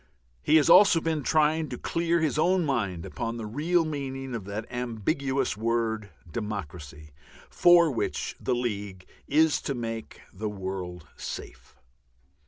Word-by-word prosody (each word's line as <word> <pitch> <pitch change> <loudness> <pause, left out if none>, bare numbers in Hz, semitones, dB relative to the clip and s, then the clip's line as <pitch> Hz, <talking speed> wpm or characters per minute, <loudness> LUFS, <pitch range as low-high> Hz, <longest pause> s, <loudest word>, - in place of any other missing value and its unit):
He 155 - +3
has 150 -3 +5
also 190 -5 +7
been 160 -2 -1
trying 155 +2 +2
to - - -5
clear 170 0 0
his 155 -1 0
own 180 +1 +3
mind 100 - -1
upon 115 0 -4
the 115 - -5
real 160 +10 +1
meaning 135 -3 -4
of 110 -5 -4
that 105 +2 -5
ambiguous 125 +3 -1
word 110 -1 -1 0.2
"democracy," 80 -8 -6 0.4
for 175 -2 +6
which 120 - -2
the 125 - 0
League 100 -6 -4 0.2
is 155 +2 +3
to 140 - -3
make 115 -2 -6
the 105 +2 -3
world 95 -3 -5
"safe." - - -8
120 Hz, 140 wpm, -27 LUFS, 105-155 Hz, 0.4 s, also